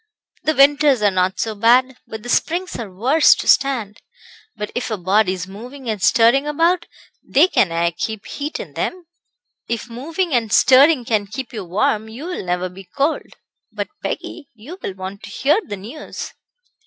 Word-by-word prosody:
"The 310 Hz, -, 0 dB
winters 280 Hz, -3 st, +4 dB
are 205 Hz, -, +4 dB
not 185 Hz, 0 st, 0 dB
so 225 Hz, -, -1 dB
bad, 245 Hz, +5 st, +3 dB
but 220 Hz, -1 st, -8 dB
the 245 Hz, -, -8 dB
springs 345 Hz, +8 st, 0 dB
are 215 Hz, -5 st, -6 dB
worse 260 Hz, +12 st, +4 dB
to -, -, -6 dB
stand. 245 Hz, -7 st, +2 dB, 0.5 s
But 210 Hz, -, -5 dB
if 245 Hz, -, -3 dB
a 215 Hz, -, -2 dB
body's 185 Hz, -1 st, +1 dB
moving 245 Hz, +7 st, -10 dB
and 210 Hz, -3 st, -5 dB
stirring 250 Hz, +6 st, +4 dB
about 335 Hz, +4 st, +1 dB, 0.3 s
they 305 Hz, +7 st, +4 dB
can 195 Hz, -, +2 dB
aye 170 Hz, +1 st, +1 dB
keep 215 Hz, +5 st, -5 dB
heat 295 Hz, +2 st, -5 dB
in -, -, -8 dB
them." 365 Hz, -1 st, -4 dB, 0.6 s
"If 235 Hz, +1 st, -4 dB
moving 320 Hz, +8 st, -3 dB
and 230 Hz, -4 st, +1 dB
stirring 265 Hz, +2 st, +5 dB
can 215 Hz, -3 st, 0 dB
keep 245 Hz, +5 st, -7 dB
you 215 Hz, -3 st, -5 dB
warm 210 Hz, +4 st, 0 dB
you 245 Hz, +8 st, -8 dB
will 360 Hz, -, -4 dB
never 180 Hz, 0 st, -1 dB
be 185 Hz, +2 st, -12 dB
cold. 290 Hz, +3 st, -1 dB, 0.4 s
But, -, -, -4 dB
Peggy, 285 Hz, -4 st, -5 dB
you 285 Hz, -, -11 dB
will 190 Hz, -, -5 dB
want 190 Hz, +2 st, -7 dB
to -, -, -10 dB
hear 285 Hz, -, +2 dB
the 205 Hz, -, -6 dB
news." 230 Hz, +11 st, -8 dB
235 Hz, 180 wpm, -20 LUFS, 205-285 Hz, 0.6 s, stirring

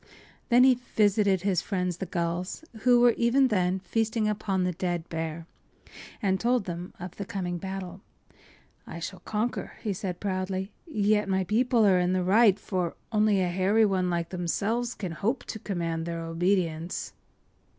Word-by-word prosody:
” -, -, -29 dB
Then 245 Hz, 0 st, +6 dB
he 255 Hz, -2 st, +5 dB, 0.2 s
visited 205 Hz, -3 st, +3 dB
his 190 Hz, -4 st, +1 dB
friends, 180 Hz, -4 st, -2 dB
the 190 Hz, -, -5 dB
gulls, 175 Hz, -, -3 dB
who 245 Hz, +1 st, +5 dB
were 240 Hz, -1 st, +6 dB
even 255 Hz, +3 st, +3 dB
then 185 Hz, -3 st, +1 dB
feasting 225 Hz, +1 st, 0 dB
upon 200 Hz, -3 st, 0 dB
the 180 Hz, -, +1 dB
dead 175 Hz, -1 st, -3 dB
bear, 160 Hz, 0 st, -4 dB, 0.8 s
and 190 Hz, -1 st, +2 dB
told 240 Hz, -3 st, +1 dB
them 175 Hz, 0 st, -5 dB
of 180 Hz, -1 st, -8 dB
the 200 Hz, -, -3 dB
coming 180 Hz, -3 st, -4 dB
battle. 190 Hz, 0 st, -6 dB, 0.9 s
“I 170 Hz, -, -7 dB
shall 180 Hz, +2 st, -6 dB
conquer,” 220 Hz, +3 st, -3 dB
he 210 Hz, -3 st, -1 dB
said, 180 Hz, -1 st, -4 dB
proudly. 190 Hz, 0 st, -2 dB, 0.2 s
“Yet 210 Hz, -6 st, +1 dB
my 190 Hz, 0 st, +2 dB
people 230 Hz, +3 st, +2 dB
are 190 Hz, -3 st, +5 dB
in 180 Hz, +1 st, +1 dB
the 185 Hz, -1 st, +1 dB
right, 205 Hz, +2 st, +5 dB
for 180 Hz, -4 st, -2 dB, 0.2 s
only 210 Hz, -3 st, +3 dB
a 180 Hz, -, +1 dB
hairy 195 Hz, +5 st, +3 dB
one 185 Hz, -3 st, +1 dB
like 170 Hz, -1 st, -1 dB
themselves 205 Hz, +7 st, -1 dB
can 185 Hz, -5 st, -5 dB
hope 220 Hz, +9 st, -1 dB
to 220 Hz, -, -6 dB
command 170 Hz, -5 st, -3 dB
their 170 Hz, -1 st, -3 dB
obedience. 170 Hz, -1 st, -1 dB
190 Hz, 170 wpm, -27 LUFS, 180-215 Hz, 0.9 s, Then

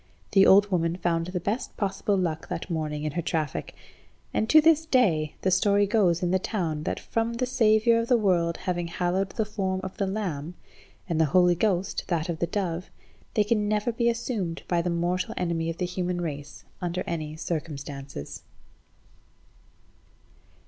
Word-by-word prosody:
The 195 Hz, 0 st, +6 dB
old 200 Hz, +1 st, +6 dB
woman 170 Hz, -2 st, +1 dB
found 170 Hz, -1 st, 0 dB
the 180 Hz, 0 st, -3 dB
best 205 Hz, +8 st, -3 dB
possible 200 Hz, 0 st, 0 dB
luck 165 Hz, -4 st, -2 dB
that 170 Hz, -, -4 dB
morning 150 Hz, -2 st, -2 dB
in 155 Hz, -, -1 dB
her 170 Hz, -, -2 dB
traffic. 155 Hz, -3 st, -3 dB, 0.6 s
And 220 Hz, -, 0 dB
to 310 Hz, -, +8 dB
this 320 Hz, 0 st, +4 dB
day 170 Hz, -, +2 dB
the 190 Hz, -, +2 dB
story 200 Hz, +2 st, +4 dB
goes 190 Hz, -5 st, +2 dB
in 175 Hz, -, +1 dB
the 190 Hz, -, +3 dB
town, 180 Hz, -7 st, -2 dB
that -, -, -2 dB
from 230 Hz, +1 st, -1 dB
the 245 Hz, +2 st, -1 dB
Saviour 230 Hz, -2 st, +3 dB
of 230 Hz, -, -2 dB
the 245 Hz, -, +4 dB
world 175 Hz, -6 st, +1 dB
having 175 Hz, -2 st, -2 dB
hallowed 180 Hz, +3 st, -1 dB
the 220 Hz, +2 st, -2 dB
form 195 Hz, -3 st, -2 dB
of 190 Hz, -, -6 dB
the 195 Hz, -, 0 dB
lamb, 180 Hz, -5 st, -3 dB, 0.5 s
and 165 Hz, -1 st, +1 dB
the -, -, +5 dB
Holy 180 Hz, -1 st, +6 dB
Ghost 185 Hz, 0 st, 0 dB
that 170 Hz, -2 st, -1 dB
of 165 Hz, -2 st, -3 dB
the 170 Hz, -, 0 dB
dove, 180 Hz, -2 st, -3 dB, 0.5 s
they 210 Hz, -, +4 dB
can 210 Hz, 0 st, +1 dB
never 210 Hz, +3 st, +1 dB
be 235 Hz, +1 st, +1 dB
assumed 225 Hz, -7 st, -3 dB
by 175 Hz, -1 st, +1 dB
the 175 Hz, -, -2 dB
mortal 175 Hz, +2 st, -1 dB
enemy 165 Hz, -2 st, -1 dB
of 165 Hz, -, -4 dB
the 180 Hz, -, -1 dB
human 180 Hz, 0 st, -2 dB
race 145 Hz, -4 st, -6 dB, 0.2 s
under 180 Hz, 0 st, -2 dB
any 155 Hz, -2 st, -4 dB
circumstances. 140 Hz, -, -5 dB
180 Hz, 175 wpm, -26 LUFS, 165-210 Hz, 0.6 s, to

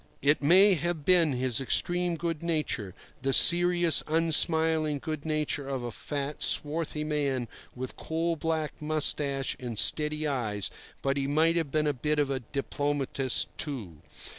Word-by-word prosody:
It 145 Hz, +1 st, +2 dB
may 190 Hz, +7 st, +5 dB
have 170 Hz, -3 st, -3 dB
been 170 Hz, -5 st, +3 dB
his 125 Hz, 0 st, -1 dB
extreme 175 Hz, +6 st, 0 dB
good 165 Hz, -1 st, -4 dB
nature, 150 Hz, -, -3 dB, 0.3 s
the 135 Hz, +1 st, 0 dB
serious, 175 Hz, +1 st, +6 dB
unsmiling 160 Hz, -1 st, +2 dB
good 155 Hz, +1 st, -6 dB
nature 150 Hz, -2 st, -2 dB
of 135 Hz, -3 st, -4 dB
a 120 Hz, -, -5 dB
fat, 145 Hz, +4 st, -6 dB
swarthy 150 Hz, 0 st, -1 dB
man 140 Hz, -5 st, -2 dB, 0.3 s
with 130 Hz, 0 st, -7 dB
coal 165 Hz, +1 st, -2 dB
black 160 Hz, -1 st, -4 dB
moustache 145 Hz, -3 st, 0 dB
and 120 Hz, -3 st, -6 dB
steady 150 Hz, +5 st, +3 dB
eyes; 115 Hz, -8 st, -2 dB, 0.3 s
but 135 Hz, 0 st, -1 dB
he 135 Hz, -1 st, -1 dB
might 160 Hz, +4 st, +2 dB
have 165 Hz, -4 st, -1 dB
been 155 Hz, +2 st, 0 dB
a 145 Hz, -, 0 dB
bit 150 Hz, +4 st, -2 dB
of 145 Hz, -2 st, 0 dB
a 135 Hz, -, -2 dB
diplomatist, 140 Hz, +1 st, -2 dB
too. 115 Hz, -, -5 dB
150 Hz, 150 wpm, -27 LUFS, 135-160 Hz, 0.3 s, serious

